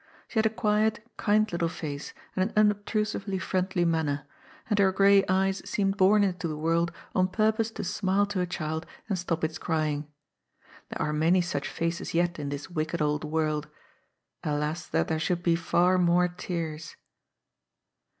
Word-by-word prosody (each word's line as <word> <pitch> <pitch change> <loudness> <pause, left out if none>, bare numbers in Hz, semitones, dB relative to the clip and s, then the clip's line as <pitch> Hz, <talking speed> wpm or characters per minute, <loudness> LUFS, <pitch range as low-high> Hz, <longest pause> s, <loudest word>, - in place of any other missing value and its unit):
She 225 - -1
had 220 - +4
a - - +1
quiet, 215 0 0
kind 215 0 +3
little 170 -1 0
face 145 -4 -6 0.2
and 185 - +2
an - - -16
unobtrusively 210 -1 +1
friendly 185 0 0
manner, 150 -4 0 0.4
and 210 -2 +1
her 195 -1 +5
gray 195 +1 +5
eyes 190 +1 +2
seemed 195 -1 +1
bom 205 +2 +5
into 180 -3 -1
the 155 -2 -4
world 165 +2 +1 0.2
on 185 -1 +3
purpose 220 +3 +1
to 225 - -6
smile 195 +1 +1
to 200 -2 -2
a 180 - -1
child 160 -1 -3 0.2
and 195 -4 -1
stop 170 -2 -2
its 160 +1 -1
crying. 155 -3 -1 0.8
There - - -3
are 150 - -1
many 165 +4 +3
such 145 -5 -2
faces 165 0 -3
yet 175 -1 +1
in 145 -1 -3
this 145 0 -5
wicked 165 -1 -2
old 150 0 0
world. 155 -1 -1 0.8
Alas 150 +3 -2
that - - 0
there 160 -1 -1
should 175 +2 -1
be 170 -1 +3
far 175 +2 +2
more 180 0 +4
tears 165 -3 -5
175 Hz, 170 wpm, -28 LUFS, 160-195 Hz, 0.8 s, her